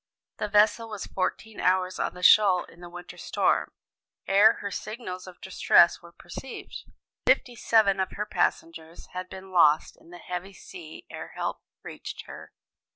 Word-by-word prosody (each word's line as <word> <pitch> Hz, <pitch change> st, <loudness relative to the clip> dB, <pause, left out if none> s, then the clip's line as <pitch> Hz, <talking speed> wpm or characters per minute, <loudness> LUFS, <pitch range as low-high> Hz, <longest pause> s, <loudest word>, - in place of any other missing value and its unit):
The 210 Hz, -, -1 dB
vessel 215 Hz, +2 st, +3 dB
was 210 Hz, -3 st, -6 dB
fourteen 215 Hz, +3 st, -3 dB
hours 185 Hz, 0 st, +1 dB
on -, -, -2 dB
the 180 Hz, -, -10 dB
shoal 195 Hz, -4 st, +6 dB
in 175 Hz, -, -17 dB
the 175 Hz, -, -9 dB
winter 175 Hz, 0 st, -10 dB
storm, -, -, 0 dB, 0.6 s
ere 205 Hz, +3 st, +6 dB
her 200 Hz, -, -6 dB
signals 195 Hz, -3 st, -6 dB
of 180 Hz, -, -12 dB
distress 175 Hz, -2 st, +4 dB
were 170 Hz, -, -14 dB
perceived. 185 Hz, +10 st, -9 dB, 0.4 s
Fifty 245 Hz, -, +3 dB
seven 215 Hz, -4 st, +3 dB
of 190 Hz, -1 st, -1 dB
her 210 Hz, -, -3 dB
passengers 165 Hz, -4 st, -3 dB
had 185 Hz, 0 st, -6 dB
been 190 Hz, 0 st, -10 dB
lost 155 Hz, -4 st, +4 dB
in -, -, -21 dB
the 175 Hz, -, -11 dB
heavy 180 Hz, +2 st, -6 dB
sea 165 Hz, -3 st, -11 dB
ere -, -, -8 dB
help -, -, -3 dB, 0.2 s
reached -, -, -8 dB
her. -, -, -11 dB
185 Hz, 160 wpm, -27 LUFS, 175-210 Hz, 0.6 s, shoal